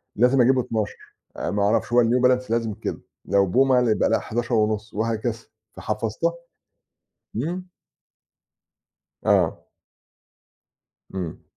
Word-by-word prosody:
لازِم 125 Hz, +3 st, +4 dB
أجيبه 130 Hz, +1 st, +4 dB
12، 110 Hz, -3 st, -4 dB, 0.2 s
آآ، -, -, -2 dB
ما 100 Hz, 0 st, 0 dB
أعرفش 115 Hz, +3 st, +1 dB
هو 120 Hz, -1 st, +6 dB
الNew 125 Hz, +2 st, +2 dB
Balance 125 Hz, -2 st, +2 dB
لازم 115 Hz, -2 st, 0 dB
كده. -, -, -5 dB, 0.2 s
لو 100 Hz, -1 st, +2 dB
Puma، 130 Hz, -2 st, +4 dB
يبقى 105 Hz, -, +2 dB
لأ، 115 Hz, -, +2 dB
11.5 110 Hz, -2 st, -1 dB
وهكذا، 115 Hz, +1 st, -1 dB, 0.4 s
فحفظتها. 110 Hz, +10 st, -2 dB, 1.0 s
إمم. 175 Hz, +9 st, -3 dB, 1.6 s
آه. -, -, +2 dB, 1.5 s
إمم. 90 Hz, -4 st, -5 dB
115 Hz, 110 wpm, -23 LUFS, 105-125 Hz, 1.6 s, هو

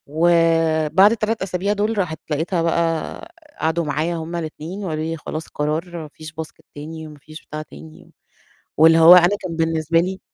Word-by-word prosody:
وبعد 165 Hz, +3 st, +3 dB
ال3 225 Hz, 0 st, -1 dB
أسابيع 190 Hz, +2 st, -1 dB
دُول، 210 Hz, +2 st, -1 dB
راحت 170 Hz, -5 st, -2 dB
لقيتها 165 Hz, +4 st, -1 dB
بقى، 165 Hz, -, -2 dB, 0.3 s
قعدوا 160 Hz, +1 st, 0 dB
معايا 155 Hz, +3 st, -1 dB
هُم 165 Hz, +1 st, -5 dB
ال2 170 Hz, +4 st, -6 dB
وقالوا 155 Hz, -3 st, -3 dB
لي: 165 Hz, +1 st, -3 dB
"خلاص 155 Hz, +1 st, -6 dB
قرار، 160 Hz, +4 st, -3 dB
ما 160 Hz, -2 st, -7 dB
فيش 155 Hz, -1 st, -10 dB
Basket 160 Hz, 0 st, -9 dB
تاني، 160 Hz, +2 st, -8 dB
وما 150 Hz, -1 st, -13 dB
فيش 155 Hz, +2 st, -13 dB
بتاع 155 Hz, +1 st, -6 dB
تاني." 80 Hz, -, -14 dB, 0.7 s
واللي 165 Hz, +1 st, +6 dB
هو 165 Hz, +2 st, +9 dB
أنا 180 Hz, +3 st, +5 dB
كان 170 Hz, -3 st, -5 dB
بالنسبة 165 Hz, 0 st, +1 dB
لي 185 Hz, +2 st, -3 dB
165 Hz, 170 wpm, -20 LUFS, 155-175 Hz, 0.7 s, هو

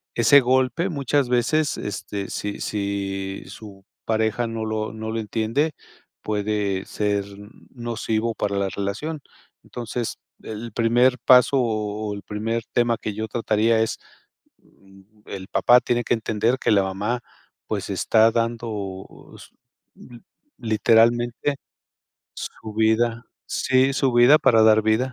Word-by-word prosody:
ese 120 Hz, +5 st, +6 dB
golpe, 130 Hz, +7 st, +1 dB
muchas 140 Hz, -3 st, 0 dB
veces, 125 Hz, +5 st, +1 dB
este, 100 Hz, 0 st, -5 dB
si 105 Hz, 0 st, -5 dB
si 100 Hz, -1 st, -3 dB
su 100 Hz, -3 st, -12 dB, 0.2 s
pareja 110 Hz, +1 st, 0 dB
no 115 Hz, -1 st, -4 dB
lo 110 Hz, 0 st, -3 dB
no 110 Hz, 0 st, -5 dB
lo 115 Hz, -, -2 dB
entiende, 115 Hz, +8 st, -1 dB, 0.5 s
puede 105 Hz, -2 st, -2 dB
ser 100 Hz, -1 st, -1 dB, 0.5 s
nocivo 115 Hz, -1 st, -2 dB
para 100 Hz, -1 st, -2 dB
la 100 Hz, -1 st, 0 dB
relación. 105 Hz, +12 st, -4 dB, 0.4 s
Entonces, 120 Hz, -1 st, -5 dB, 0.3 s
el 110 Hz, +2 st, -7 dB
primer 120 Hz, +2 st, +3 dB
paso 125 Hz, +2 st, +6 dB
o 110 Hz, -2 st, -2 dB
el 100 Hz, -, -7 dB
primer 115 Hz, +2 st, -3 dB
tema 120 Hz, -1 st, +2 dB
que 105 Hz, -1 st, -5 dB
yo 110 Hz, +2 st, -4 dB
trataría 110 Hz, 0 st, +1 dB
es, 110 Hz, -, -1 dB, 0.6 s
mm, 95 Hz, 0 st, -22 dB, 0.2 s
el 95 Hz, -1 st, -7 dB
papá 120 Hz, +3 st, +5 dB
tiene 120 Hz, -1 st, 0 dB
que -, -, +1 dB
entender 115 Hz, +2 st, 0 dB
que -, -, 0 dB
la 100 Hz, -2 st, +4 dB
mamá, 100 Hz, +6 st, -2 dB, 0.5 s
pues, -, -, -3 dB
está 110 Hz, 0 st, +3 dB
dando 110 Hz, -5 st, -4 dB
s -, -, -14 dB, 0.5 s
l 120 Hz, -1 st, -14 dB, 0.4 s
literalmente, 120 Hz, +4 st, +2 dB, 0.8 s
su 110 Hz, -1 st, -8 dB
vida. 115 Hz, +1 st, +1 dB, 0.2 s
Sí, 130 Hz, +1 st, +2 dB
su 135 Hz, -2 st, +1 dB
vida 120 Hz, +5 st, +6 dB
para 115 Hz, -6 st, +4 dB
dar 110 Hz, 0 st, +5 dB
vida. 110 Hz, +4 st, +1 dB
110 Hz, 130 wpm, -23 LUFS, 105-120 Hz, 0.8 s, ese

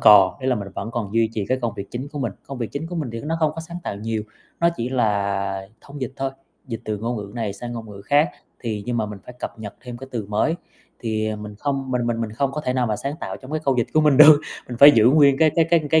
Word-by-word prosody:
còn, 100 Hz, -3 st, +7 dB
ý 130 Hz, -, -4 dB
là 130 Hz, -, +3 dB
mình 100 Hz, -4 st, -4 dB
vẫn 115 Hz, -, -4 dB
còn 115 Hz, -3 st, -4 dB
duy 115 Hz, -1 st, +3 dB
trì 105 Hz, -3 st, -2 dB
cái 130 Hz, -, +1 dB
công 115 Hz, -2 st, -1 dB
việc 100 Hz, 0 st, -7 dB
chính 130 Hz, +4 st, -5 dB
của 145 Hz, -, -5 dB
mình. 120 Hz, -7 st, -1 dB
Công 135 Hz, -2 st, -6 dB
việc 115 Hz, -4 st, -4 dB
chính 145 Hz, +3 st, -3 dB
của 175 Hz, +1 st, -5 dB
mình 145 Hz, -7 st, -2 dB
thì 115 Hz, -, -4 dB
nó 160 Hz, +5 st, -2 dB
không 155 Hz, -1 st, +3 dB
có 165 Hz, -, -5 dB
sáng 165 Hz, +1 st, -8 dB
tạo 100 Hz, -, -3 dB
nhiều, 110 Hz, +1 st, -2 dB, 0.4 s
nó 170 Hz, -, +5 dB
chỉ 115 Hz, -, -2 dB
là 100 Hz, -5 st, 0 dB
thông 140 Hz, 0 st, -11 dB
dịch 130 Hz, 0 st, -3 dB
thôi, 135 Hz, 0 st, -1 dB, 0.4 s
dịch 115 Hz, -3 st, -5 dB
từ 105 Hz, -1 st, -2 dB
ngôn 115 Hz, +3 st, -2 dB
ngữ 100 Hz, -2 st, -6 dB
này 110 Hz, -4 st, -2 dB
sang 120 Hz, +5 st, -7 dB
ngôn 115 Hz, -2 st, -7 dB
ngữ 100 Hz, -1 st, -10 dB
khác, 145 Hz, +7 st, +3 dB, 0.3 s
thì 110 Hz, -4 st, -3 dB
nhưng 120 Hz, -1 st, -1 dB
mà 110 Hz, -2 st, 0 dB
mình 105 Hz, -1 st, -7 dB
phải 125 Hz, -, -10 dB
cập -, -, -6 dB
nhật 105 Hz, -2 st, -7 dB
thêm 125 Hz, -2 st, -8 dB
cái 135 Hz, +2 st, -10 dB
từ 115 Hz, -5 st, -3 dB
mới, 105 Hz, +10 st, +1 dB, 0.5 s
thì, 110 Hz, -2 st, -1 dB
ờ, 110 Hz, -, -3 dB
mình 105 Hz, 0 st, -8 dB
không 135 Hz, -1 st, -2 dB
mình 125 Hz, -2 st, 0 dB
mình 115 Hz, -1 st, -1 dB
mình 110 Hz, -2 st, -3 dB
không 135 Hz, +4 st, 0 dB
có 150 Hz, -, -3 dB
thể 125 Hz, -4 st, -1 dB
nào 125 Hz, -2 st, +1 dB
mà 105 Hz, -, 0 dB
sáng 140 Hz, +5 st, -3 dB
tạo -, -, -4 dB
trong 130 Hz, 0 st, -12 dB
cái 155 Hz, -, 0 dB
câu 135 Hz, -, +3 dB
dịch 120 Hz, -, +2 dB
của 155 Hz, -, +6 dB
mình 150 Hz, -3 st, +4 dB
được, 150 Hz, +1 st, +9 dB, 0.3 s
mình 120 Hz, -, -5 dB
phải 140 Hz, +2 st, +11 dB
giữ 110 Hz, -5 st, +4 dB
nguyên 140 Hz, -2 st, +5 dB
cái 160 Hz, -1 st, +5 dB
cái 165 Hz, -, +5 dB
cái 170 Hz, -1 st, +5 dB
cái 160 Hz, -, +6 dB
120 Hz, 305 wpm, -23 LUFS, 110-140 Hz, 0.5 s, phải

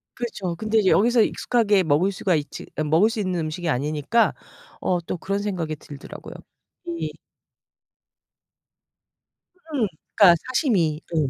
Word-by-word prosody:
그렇죠. 200 Hz, -8 st, -4 dB
근데 220 Hz, +5 st, +1 dB
이제 195 Hz, -3 st, +3 dB
여기서 235 Hz, +3 st, +4 dB
익숙하게 210 Hz, -6 st, +2 dB
먹을 160 Hz, +5 st, +2 dB
수가 185 Hz, -2 st, 0 dB
있지 150 Hz, -1 st, -4 dB, 0.2 s
먹을 165 Hz, +8 st, +4 dB
수 225 Hz, -, -4 dB
있는 185 Hz, -4 st, -1 dB
음식이 160 Hz, +2 st, -4 dB
아니니까 150 Hz, -, +1 dB, 0.5 s
어 180 Hz, -, +1 dB
또 -, -, -1 dB
그런 195 Hz, +4 st, -2 dB
생각이 180 Hz, -7 st, -3 dB
들더라고요. 145 Hz, -1 st, -10 dB, 0.5 s
이 340 Hz, -1 st, -3 dB, 2.6 s
음. 245 Hz, -7 st, +1 dB, 0.3 s
그러니까 185 Hz, -5 st, +8 dB, 0.2 s
사시미. 175 Hz, -, +1 dB
예. 150 Hz, -4 st, +2 dB
185 Hz, 285 characters per minute, -23 LUFS, 155-220 Hz, 2.6 s, 그러니까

